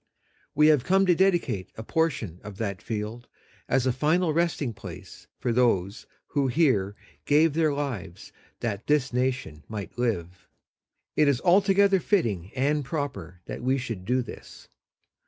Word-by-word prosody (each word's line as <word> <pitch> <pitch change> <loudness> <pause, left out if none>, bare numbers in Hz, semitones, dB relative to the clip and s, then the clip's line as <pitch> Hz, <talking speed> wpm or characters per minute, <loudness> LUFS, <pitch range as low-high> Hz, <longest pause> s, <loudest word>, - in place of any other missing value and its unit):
We 150 - +5
have 150 -5 +4
come 195 +4 +3
to 180 - +5
dedicate 175 - +1
a 110 - -7
portion 120 - -1
of 105 -2 -9
that 100 -4 -3
field 110 +2 -5 0.4
as 130 -2 +2
a 130 - +3
final 155 +5 +2
resting 155 -6 0
place - - -11
for 120 -2 -1
those 105 -5 +1 0.2
who 140 -2 +1
here 120 - +2 0.3
gave 150 +1 +4
their 160 -1 +2
lives 115 -11 -5 0.3
that 110 -4 -3
this 145 -3 +2
nation 125 - -2
might 105 0 -7
live. 90 -7 -2 0.7
It 150 - +4
is 140 -4 +3
altogether 195 +1 +4
fitting 110 - 0
and 145 +3 +1
proper 125 - -5
that - - -6
we 130 +2 +1
should 115 -8 -5
do 125 +5 +1
this. 120 - -12
130 Hz, 150 wpm, -26 LUFS, 105-155 Hz, 0.7 s, We